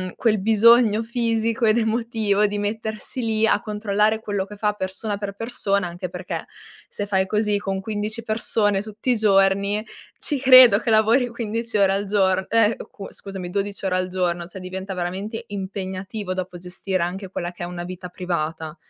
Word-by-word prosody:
quel 215 -3 +1
bisogno 225 +1 +5
fisico 230 -1 0
ed 215 +1 +4
emotivo 220 -2 +1
di 205 0 -3
mettersi 220 +4 -4
lì 220 -1 +1
a 205 -1 +2
controllare 210 0 0
quello 205 -3 -2
che 205 +1 -11
fa 210 0 0
persona 200 +1 -3
per 200 -1 -5
persona, 200 -3 -1
anche 175 +1 -6
perché, 180 +1 -5 0.4
se 205 - -4
fai 190 -1 +1
così 210 +1 +1
con 195 -1 -3
15 215 +2 -4
persone 215 -2 +1
tutti 215 +4 -3
i 240 - +2
giorni, 200 0 +3 0.3
ci 290 -3 +2
credo 255 -5 +8
che 240 - -3
lavori 225 +4 +4
15 230 -1 -3
ore 195 -1 +4
al 200 +1 -1
gior 190 -2 +2
eh, 225 -1 +3
uhm, 195 - -9
q - - -14
scusami, 190 -3 -6
12 200 +1 -3
ore 185 -1 +1
al 185 0 0
giorno, 175 -2 -1
cioè 190 +2 -9
diventa 190 +1 -6
veramente 190 +5 -4
impegnativo 190 0 -5
dopo 185 -1 -5
gestire 185 +1 -3
anche 185 +2 -4
quella 175 -2 -4
che 175 - -8
è - - -2
una 175 0 -6
vita 180 0 -7
privata, 160 -3 -4
205 Hz, 180 wpm, -22 LUFS, 190-220 Hz, 0.4 s, credo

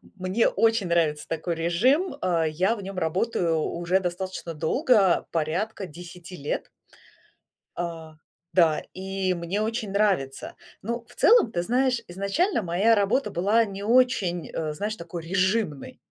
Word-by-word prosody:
Мне 185 +4 +1
очень 225 -4 +2
нравится 160 -3 +1
такой 165 +1 -2
режим. 240 - +2
А, 170 -3 +1
я 180 +8 +1
в 205 - -8
нем 195 0 -7
работаю 170 0 0
уже 175 +4 0
достаточно 180 -1 -4
долго, 195 - +3
порядка 180 +6 -2
10 175 +2 -11
лет. 145 - -3 1.1
А, 165 -2 -5 0.4
да, 165 -4 +3
и 190 0 -2
мне 175 +4 -3
очень 220 -1 -2
нравится. 195 -10 0 0.3
Ну, 235 +3 -4
в 245 - -18
целом, 450 - +5
ты 175 - -1
знаешь, 250 +3 +1
изначально, 200 - 0
моя 190 +6 +3
работа 220 +7 +1
была 205 +7 +3
не 200 0 -7
очень, 210 - +2
а, 155 -1 -2
знаешь, 210 +7 -3
такой 170 -2 -7
режимной. 185 -3 -1
185 Hz, 140 wpm, -25 LUFS, 170-220 Hz, 1.1 s, целом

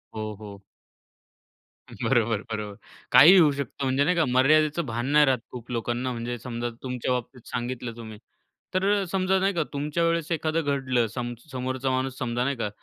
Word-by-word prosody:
हो, 110 0 -4
हो. 100 -2 -10 1.3
बरोबर, 115 -4 0
बरोबर. 105 -2 -4 0.4
काहीही 155 +10 +9
होऊ 155 -4 +6
शकतं, 140 0 -5
म्हणजे 135 +1 +2
नाही 180 +5 +2
का, 165 -2 +3
मर्यादेचं 150 +5 +3
भान 120 -1 -3
नाही 150 0 +6
राहत 130 -3 +2
खूप 125 -1 -9
लोकांना, 120 +2 -2
म्हणजे 120 0 -4
समजा, 120 0 -4
तुमच्या 125 -1 -3
बाबतीत 125 0 -4
सांगितलं 120 -1 -4
तुम्ही. 110 -2 -9 0.6
तर 185 +1 +1 0.2
अ, - - -1
समजा, 190 0 +2
नाही 195 +1 +1
का, 170 -3 0
तुमच्या 150 +4 -1
वेळेस 165 -1 0
एखादं 160 0 0
घडलं. 130 -4 0
सम 120 -1 -3 0.2
समोरचा 130 +1 -2
माणूस 130 0 -2
समजा, 120 0 -1
नाही 140 +2 0
का, 110 -3 -2
130 Hz, 175 wpm, -26 LUFS, 120-150 Hz, 1.3 s, काहीही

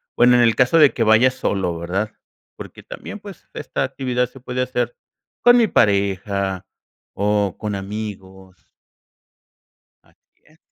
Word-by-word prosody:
Bueno, 125 0 +5
en 120 - +4
el 115 -1 +3
caso 130 +6 +3
de 150 -3 +6
que 120 - -4
vayas 115 +4 +4
solo, 95 -8 -1
¿verdad? 95 +6 -3 0.4
Porque - - -11
también, 210 - -9
pues, 200 -3 -12
esta - - -3
actividad 125 -2 -1
se 135 - -15
puede 125 0 -4
hacer 125 -2 -2 0.5
con 245 0 +7
mi 235 - +5
pareja, 100 - 0 0.5
o, 105 -1 0
con 105 -1 -3
amigos. 95 -2 -8 1.4
Asi - - -33
es. 155 +1 -25
110 Hz, 140 wpm, -20 LUFS, 100-125 Hz, 1.4 s, con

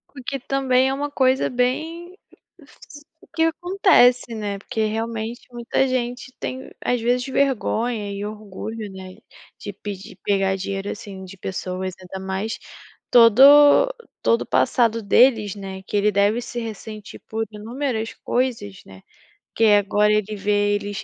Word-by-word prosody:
O 260 - -9
que 275 -1 -3
também 260 0 +1
é - - -1
uma 290 +1 -3
coisa 260 -1 +2
bem 320 +9 -2 0.4
s 290 0 -16 0.3
que 325 - +2
acontece, 325 - +3
né, 205 -2 -4
porque, 220 +2 -3
realmente, 225 +2 -3
muita 240 +2 0
gente 250 0 -3
tem, 260 +1 -6
às 245 -1 0
vezes, 245 +2 +1
vergonha 240 -5 0
e 200 +1 -5
orgulho, 215 0 -7
né, 185 -1 -10 0.4
de 205 - -6
pedir 200 0 -8
pegar 195 -1 +1
dinheiro, 195 +1 -4
assim, 195 -3 -8
de 190 +1 -11
pessoas, 185 0 -4
ainda 190 +1 -8
mais 195 +4 -3 0.5
todo 285 - +7 0.3
todo 465 - +3
o - - -4
passado 230 -2 +2
deles, 215 -1 +4
né, 190 -1 -8
que - - -6
ele 210 +1 +2
deve 205 +4 +2
se 240 0 -6
ressentir 215 -2 -8
por 225 0 -2
inúmeras 225 +1 -4
coisas, 230 -6 -2
né, 95 0 -14 0.5
que 225 - +3
agora 210 0 +4
ele 215 0 -1
vê 205 +1 +1
eles 205 0 -4
220 Hz, 145 wpm, -22 LUFS, 200-255 Hz, 0.5 s, todo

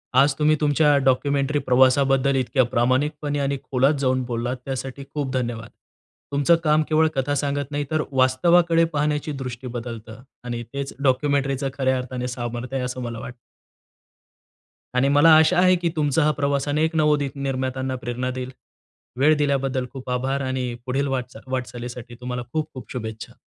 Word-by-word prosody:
आज 135 +2 +5
तुम्ही 155 0 +4
तुमच्या 145 0 +4
डॉक्युमेंटरी 140 +2 +1
प्रवासाबद्दल 135 +1 +4
इतक्या 130 0 +2
प्रामाणिकपणे 145 +4 0
आणि 140 0 0
खोलात 135 +3 +2
जाऊन 130 -1 +1
बोललात 120 +1 -2
त्यासाठी 135 0 -5
खूप 145 -3 -2
धन्यवाद. 120 -3 -3 0.6
तुमचं 145 +4 +4
काम 155 0 +3
केवळ 160 0 +4
कथा 135 +2 0
सांगत 145 0 -2
नाही, 145 0 -2
तर 155 -1 +1
वास्तवाकडे 165 +6 +4
पाहण्याची 150 +1 0
दृष्टी 125 0 -6
बदलतं. 115 0 -8 0.2
आणि 120 -1 -4
तेच 140 0 -4
डॉक्युमेंटरीच 140 0 +1
खऱ्या 130 -1 +1
अर्थाने 125 0 -4
सामर्थ्य 120 +1 -5
आहे, 125 - -2
असं 125 0 -5
मला 115 -2 -5
वाटतं. 125 - -8 1.6
आणि 130 +2 +3
मला 145 +3 +6
आशा 160 +2 +4
आहे, 185 0 +5
की 175 -1 -1
तुमचा 150 0 +2
हा 150 - +3
प्रवास 140 0 0
अनेक 160 +3 +1
नवोदित 150 -3 +2
निर्मात्यांना 130 -1 -2
प्रेरणा 120 +1 -2
देईल. 130 0 -5 0.7
वेळ 155 +3 +5
दिल्याबद्दल 135 -3 0
खूप 130 -1 -8
आभार 135 +2 -1
आणि 130 -2 -2
पुढील 135 +2 0
वाटचा 125 -3 -4
वाटचालीसाठी 120 -2 -5
तुम्हाला 125 -1 -4
खूप-खूप 155 -4 -4
शुभेच्छा. 110 -3 -6
135 Hz, 150 wpm, -23 LUFS, 125-145 Hz, 1.6 s, मला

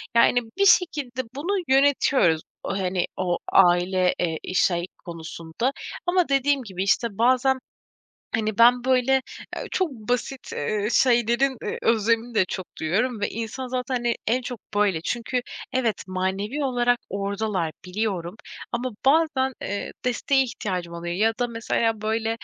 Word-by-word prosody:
yani, 245 +1 +5 0.2
bir 400 - +3
şekilde 290 -10 +3
bunu 365 +7 -1
yönetiyoruz, 265 - +3 0.2
hani, 185 -2 -1
o, 180 -2 0
aile, 180 +1 +4
eee, 165 -3 -1
şey 175 -1 +2 0.2
konusunda 165 +6 -4 0.3
ama 355 -2 +2
dediğim 275 0 +2
gibi, 190 -4 -4
işte, 200 +4 +2
bazen, 255 +3 +3 0.8
hani, 215 -2 -2
ben, 240 +1 +6
böyle, 260 +1 +3 0.3
eee, - - -5
çok 370 -5 0
basit, 245 +2 -3
eee, 205 +7 -1
şeylerin, 240 +2 +3
eee, - - -3
özlemini 230 +1 +1
de 200 -3 +4
çok 185 0 -5
duyuyorum 215 +9 0
ve 205 - 0
insan 230 +4 -5
zaten, 255 +1 -2
hani, 240 -1 0
en 245 +4 +2
çok 245 -2 -6 0.2
böyle. 200 -6 +2
Çünkü 240 +6 -2 0.3
evet, 240 -4 0
manevi 190 +9 -2
olarak 245 -2 +2
oradalar 200 -3 -2
biliyorum 185 -2 -2 0.4
ama 245 +2 -2
bazen, 275 -3 +3
eee, 200 +1 -4
desteğe 270 +2 +2
ihtiyacım 185 -8 -4
oluyor 170 0 -4
ya 220 +4 +2
da 245 - +1
mesela 230 -1 -1
böyle 220 +1 0
230 Hz, 140 wpm, -24 LUFS, 190-260 Hz, 0.8 s, ben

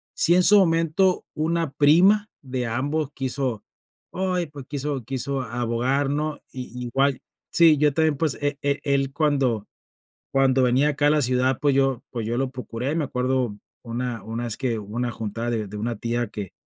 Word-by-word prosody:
si 170 - +4
en 180 - +4
su 210 +3 +7
momento 165 +1 +2
una 165 -1 -1
prima 180 +10 +4
de 130 -3 -3
ambos 140 +6 -1
quiso, 130 -4 -2 0.5
oye 185 -2 -1
pues 145 -3 -10
quiso 140 -2 -3
quiso 135 +2 -2
abogar, 120 +3 -1
¿no? 150 +1 -2
Y 125 -1 -6
igual. 135 +2 +1 0.3
Sí, 165 -3 +6
yo 150 0 +3
también 160 0 +2
pues, 155 -1 0
e 145 0 0
e 140 0 0
él 140 -1 +1
cuando 135 -8 +1 0.7
cuando 135 -1 +3
venía 130 +4 +3
acá 145 0 +1
a - - +4
la 150 -1 +3
ciudad 130 +1 +2
pues 145 -2 +2
yo 135 -2 +1
pues 115 -3 -4
yo 115 +2 -1
lo 135 -1 -1
procuré, 125 +2 -4
me 165 -2 0
acuerdo 125 -4 -1 0.3
una 120 -1 -4
una 115 +2 -4
vez 115 -3 -1
que 120 -4 -1
hubo 105 +1 -8
una 120 0 -1
juntada 115 +2 -4
de 110 -3 -1
de 105 - -8
una 115 +2 -2
tía 120 +1 -2
que, 100 -3 -7
135 Hz, 185 wpm, -24 LUFS, 120-150 Hz, 0.7 s, su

